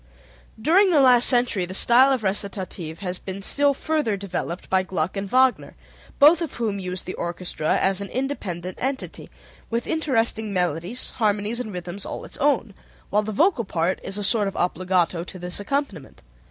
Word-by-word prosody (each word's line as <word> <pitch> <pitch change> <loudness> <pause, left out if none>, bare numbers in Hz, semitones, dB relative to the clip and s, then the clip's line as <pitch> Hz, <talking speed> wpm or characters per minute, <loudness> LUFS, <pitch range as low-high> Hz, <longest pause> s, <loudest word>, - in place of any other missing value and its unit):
During 365 - +4
the 325 -5 +4
last 250 -3 +6
century 240 -6 +2
the 185 - -5
style 255 +6 +5
of 260 -4 0
recitative 190 -4 -2
has 180 -2 -3
been 195 +1 -7
still 285 +5 +2
further 300 -9 -1
developed 180 -2 -5
by 190 0 +2
Gluck 185 -1 -3
and 195 0 -4
Wagner, 260 +1 +2 0.4
both 305 +4 +6
of 330 - -4
whom 215 -4 -2
used 185 -1 -5
the 185 - -4
orchestra 170 -2 -2
as 190 0 +1
an 200 - -5
independent 185 -10 -4
entity, 265 +1 -3 0.4
with 230 +1 -2
interesting 230 -9 0
melodies, 180 +5 -2
harmonies 215 0 0
and 230 -4 -4
rhythms 180 +1 -6
all - - -6
its - - -9
own, 275 -7 +1 0.4
while 210 - +3
the 215 +1 -4
vocal 300 - +2
part 180 -2 -1
is 195 - -5
a 205 - -3
sort 210 0 +2
of 195 - -5
obbligato 180 -1 0
to 185 - -10
this 180 +1 -5
accompaniment. 205 - -4
205 Hz, 175 wpm, -23 LUFS, 185-255 Hz, 0.4 s, last